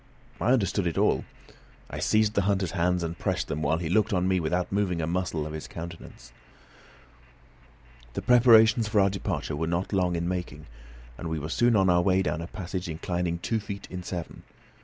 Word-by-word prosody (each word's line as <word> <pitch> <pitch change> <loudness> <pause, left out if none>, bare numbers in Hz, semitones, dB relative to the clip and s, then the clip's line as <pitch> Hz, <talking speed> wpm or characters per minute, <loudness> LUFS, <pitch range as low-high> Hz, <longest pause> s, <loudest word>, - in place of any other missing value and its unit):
I 120 - +2
understood 100 -6 +1
it 85 - -2
all. - - +2 0.6
I - - -6
seized 110 -1 +2
the 100 - +2
hunter's 95 -2 0
hands, 90 -1 +1
and 85 +1 -4
pressed - - -1
them 75 - -2
while 80 +2 +1
he 85 -1 -3
looked 105 +5 +2
on 90 0 +1
me 95 -1 +2
without 90 +2 -1
moving 95 -4 0
a 80 - 0
muscle 85 -2 -2
of 75 - -6
his 80 - -6
countenance. 85 -7 -9 1.8
The - - -4
preparations 115 -2 +6
for 105 0 +2
our 100 -1 +4
departure 80 -7 -3
were 80 +2 -2
not 85 +4 -2
long 90 -2 +1
in 85 0 -2
making, 90 -5 -4 0.5
and 85 - -4
we 80 - -2
were 75 +1 -5
soon 120 +7 +3
on 95 -2 +4
our 90 -1 +4
way 95 +1 +2
down 85 - -2
a 85 - -5
passage 95 -2 -5
inclining 85 +1 -2
two 110 +6 -1
feet 100 -1 -7
in 90 0 -5
seven. 90 -2 -6
90 Hz, 200 wpm, -27 LUFS, 85-100 Hz, 1.8 s, preparations